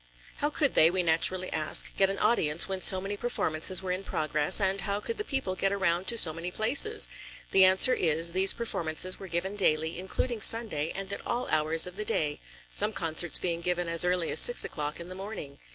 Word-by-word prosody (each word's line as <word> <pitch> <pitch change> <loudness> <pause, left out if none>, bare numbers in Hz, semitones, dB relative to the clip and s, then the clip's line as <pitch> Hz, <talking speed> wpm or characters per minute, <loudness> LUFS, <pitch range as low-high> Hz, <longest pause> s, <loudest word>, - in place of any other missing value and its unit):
How 295 - -2
could 295 -2 -1
they, 160 - +4
we 180 +1 -1
naturally 175 +3 +1
ask, 155 -1 0
get 195 -1 +1
an 195 - -5
audience, 160 -9 0
when 190 -1 -5
so 190 - +3
many 195 +2 -6
performances 185 -5 +1
were 185 - -5
in 185 +2 -4
progress, 155 -2 +1
and 195 0 -1
how 200 0 -3
could 455 - -7
the - - -3
people 270 - -4
get 195 +1 -2
around 185 -2 -2
to 235 - +1
so 160 -7 +4
many 165 +2 -7
places? 280 - +3 0.4
The 190 -1 +5
answer 190 +7 +6
is: 165 -2 0
these 190 +1 +5
performances 185 -5 -2
were 195 - -10
given 185 +3 -4
daily, 160 -3 -1
including 215 +5 -5
Sunday, 200 -10 +2
and 195 0 -6
at - - -7
all 245 +1 -4
hours 155 +1 +3
of 180 +1 -10
the 215 - -5
day, 150 -6 -3 0.3
some - - +2
concerts 165 +1 0
being 170 -2 -4
given 175 0 -3
as 165 0 +2
early 180 -2 -2
as - - +4
six 485 0 +4
o'clock 150 0 -6
in 170 - -10
the 185 - -10
morning. 190 -7 -10
185 Hz, 215 wpm, -26 LUFS, 165-200 Hz, 0.4 s, answer